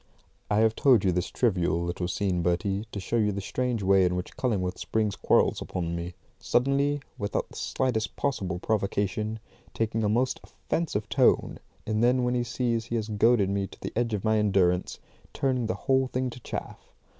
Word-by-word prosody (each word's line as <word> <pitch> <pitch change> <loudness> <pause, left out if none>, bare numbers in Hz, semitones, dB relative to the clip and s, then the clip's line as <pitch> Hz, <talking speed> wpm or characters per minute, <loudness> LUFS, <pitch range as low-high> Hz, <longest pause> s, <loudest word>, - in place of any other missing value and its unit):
I 105 +1 +3
have 110 0 +3
told 125 -7 +4
you 95 - +4
this 90 +1 -1
trivial 90 -7 +1
little 85 +1 -2
scene, 90 -1 0
Bertie, 95 +5 0
to 100 - -4
show 105 +2 +1
the 100 -1 -2
strange 120 +2 -2
way 95 0 +5
in 90 0 +1
which 90 - -5
Cullingworth 95 -8 -1
springs 110 -2 -1
quarrels - - +2
upon 85 -2 -3
me; 85 +1 -5 0.2
suddenly, 140 +3 +1 0.2
without 100 0 -2
the - - -15
slightest 125 -4 -1
possible 95 -10 -1
provocation, 105 +2 -1 0.4
taking 110 0 0
a 105 - +2
most 125 +4 +1
offensive 125 -11 -3
tone, - - +2 0.3
and 110 +1 0
then 125 +1 +3
when 125 0 +1
he 120 -1 +1
sees 120 -1 -1
he 120 - -3
has 110 -1 -2
goaded 105 -1 +3
me 100 -1 -1
to - - -15
the - - -6
edge 115 -1 0
of 100 - -4
my 110 0 +3
endurance, 95 -3 +2 0.4
turning 130 -4 0
the 115 - -1
whole 130 -1 +3
thing 130 0 -2
to 120 - -10
chaff. - - -6
110 Hz, 185 wpm, -27 LUFS, 95-120 Hz, 0.4 s, way